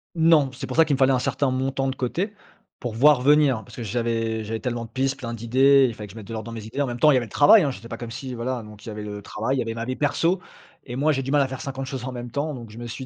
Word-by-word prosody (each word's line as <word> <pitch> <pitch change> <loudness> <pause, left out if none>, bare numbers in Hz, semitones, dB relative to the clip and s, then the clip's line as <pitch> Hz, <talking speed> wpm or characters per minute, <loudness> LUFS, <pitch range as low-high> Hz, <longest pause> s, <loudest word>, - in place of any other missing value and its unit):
Non, 160 -4 +4
c'est - - -6
pour - - -6
ça, 165 - +6
qu'il 145 -3 +1
me - - -4
fallait 135 0 +4
un 130 - +2
certain 130 +1 0
montant 135 +1 -1
de 135 - -2
côté, 175 - -2 0.5
pour 120 -3 -4
voir 140 +1 +5
venir, 145 -2 +4
hein. 110 - -9
Parce - - -14
que 120 - -6
j'avais 115 0 -1
j'avais 110 +1 -4
tellement 120 -2 -3
de 115 - -14
pistes, 135 +2 -1
plein 120 -2 -5
d'idées, 135 +4 +4
il 115 - -4
fallait 105 -1 -8
que 95 - -13
je 115 - -12
mette 110 - -8
de 115 - -7
l'ordre 110 -1 -5
dans 115 - -6
mes 110 -2 -7
idées, 125 +6 -3
en 140 - +1
même 120 0 -5
temps, 150 - +6
il - - +4
y 130 - +4
avait 120 - -1
le - - -20
travail, 150 +9 +7
hein, 150 - +1
j'étais 115 -1 -10
pas - - -6
comme 120 -1 -7
si 130 +1 -6
voilà 120 0 -3
donc 105 -1 -13
il - - -6
y - - -5
avait 105 0 -6
le 105 -1 -6
travail, 120 +7 -2
il - - 0
y - - +2
avait 115 0 -3
ma 115 0 -4
vie 130 +1 -3
perso 165 +5 +1 0.4
et 120 -2 -6
moi 150 +4 +2
j'ai 135 -2 0
du 135 - -5
mal 145 - +4
à 135 - +2
faire 130 0 -7
50 135 -2 -5
choses 130 -2 -5
en 130 - -4
même 120 -1 -7
temps, 145 +2 -2
donc 115 -4 -10
je 110 - -12
me 120 - -6
suis 130 +3 -6
130 Hz, 355 wpm, -24 LUFS, 115-140 Hz, 0.5 s, travail